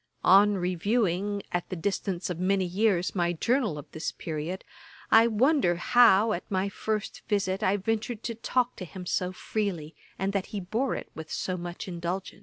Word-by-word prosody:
On 200 +2 +6
reviewing, 195 +2 0
at 175 -1 -2
the - - -3
distance 185 0 -2
of 170 - -5
many 190 +1 +2
years, 185 0 +1
my 175 -2 +1
journal 230 - 0
of 145 - -7
this 160 - -3
period, 165 +3 -5 0.5
I 225 +1 +7
wonder 235 - +3
how, 220 +2 +5
at 175 - -5
my 190 0 0
first 215 +1 -3
visit, 195 -2 0
I 200 -1 +2
ventured 220 +2 -2
to 235 - -2
talk 245 +2 0
to 185 - -6
him 180 +1 -9
so 180 +1 -1
freely, 185 -6 -3 0.2
and 195 +1 -1
that 195 -2 -1
he 205 - -4
bore 220 +8 -1
it - - -7
with 160 0 -9
so 185 - -2
much 175 +1 -6
indulgence. 175 +1 -4
190 Hz, 180 wpm, -28 LUFS, 175-215 Hz, 0.5 s, I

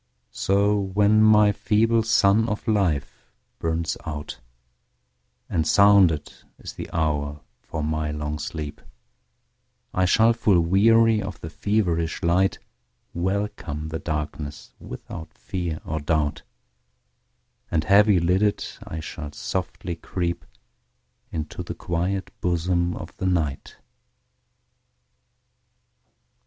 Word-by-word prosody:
So 100 +1 +2
when 100 +2 +3
my 105 -1 +6
feeble 115 +3 +2
sun 110 0 +3
of 105 +3 -4
life 95 -10 0 0.4
burns 80 0 -1
out, 75 -1 -6 1.1
And 80 -2 0
sounded 100 -7 +5 0.2
is - - -9
the - - -7
hour 75 -2 -1 0.2
for 80 -2 -5
my 75 0 -1
long 75 0 -4
sleep,I 75 +4 -7
shall, 115 +5 +4
full 105 -5 +3
weary 110 +6 +4
of 100 -3 -6
the 80 - -7
feverish 85 -6 -1
light, 90 +3 +2 0.6
Welcome 90 -5 -3
the 80 0 -4
darkness 75 -2 -5
without 80 -1 -9
fear 85 -4 -4
or 80 +1 -2
doubt, 75 -1 0 1.3
And 80 -2 +1
heavy 100 +1 +5
lidded, 95 +5 +1 0.2
I 80 - -6
shall 75 -1 -7
softly 90 0 -4
creepInto 85 -2 -7
the 85 0 -6
quiet 90 +3 -2
bosom 85 0 0
of - - -9
the 95 - -1
Night. 80 -6 -1
85 Hz, 100 wpm, -24 LUFS, 80-100 Hz, 1.3 s, my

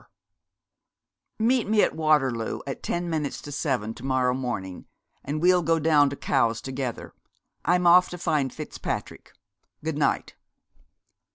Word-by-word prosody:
'Meet 235 +1 +2
me 215 -1 +4
at - - 0
Waterloo 135 -8 +1
at 135 - -5
ten 175 0 -2
minutes 155 -4 -2
to 145 - -9
seven 130 -7 -1
to 120 - -13
morrow 130 -1 +1
morning, 120 -8 -5 0.4
and 145 +3 -3
we'll 180 0 +5
go 165 0 +2
down 150 -2 +4
to 140 - -5
Cowes 115 -4 +1
together. 130 -2 -5 0.5
I'm 180 +1 +2
off 180 +1 +6
to 180 - -7
find 150 -6 0
Fitzpatrick. - - -6 0.5
Good 160 -2 -2
night.' 145 - 0
145 Hz, 140 wpm, -25 LUFS, 130-170 Hz, 0.5 s, off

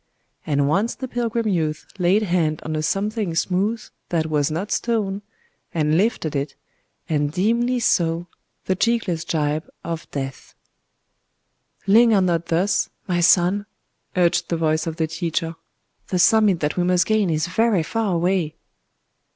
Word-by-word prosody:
And 140 -2 +2
once 195 +10 +1
the 260 - -5
pilgrim 235 -2 -1
youth 160 -6 -1
laid 185 +4 +3
hand 170 -5 0
on 155 - -3
a 155 - -1
something 200 +2 -1
smooth 195 +7 0 0.3
that 165 -2 0
was 150 -2 +1
not 170 +7 -3
stone,—and 200 -7 -2
lifted 180 -5 0
it,—and 145 +1 -4
dimly 235 +8 +1
saw 170 -6 +1 0.4
the 185 - +1
cheekless 205 -6 0
gibe 155 -2 -1
of 165 -1 -5
death. 135 -2 -6 1.3
"Linger 220 +1 +5
not 170 -2 0
thus, 175 +4 +1 0.2
my 175 -2 0
son!" 180 +4 +3 0.5
urged 175 -1 +2
the 170 - 0
voice 155 0 0
of 160 - -3
the 160 -1 0
teacher;—"the 165 +2 -5
summit 210 -1 +4
that 150 +2 -1
we 180 - +2
must 180 -1 +3
gain 215 -4 +2
is 155 0 0
very 195 0 +2
far 215 +1 -1
away!" 170 -2 0
175 Hz, 135 wpm, -22 LUFS, 160-205 Hz, 1.3 s, Linger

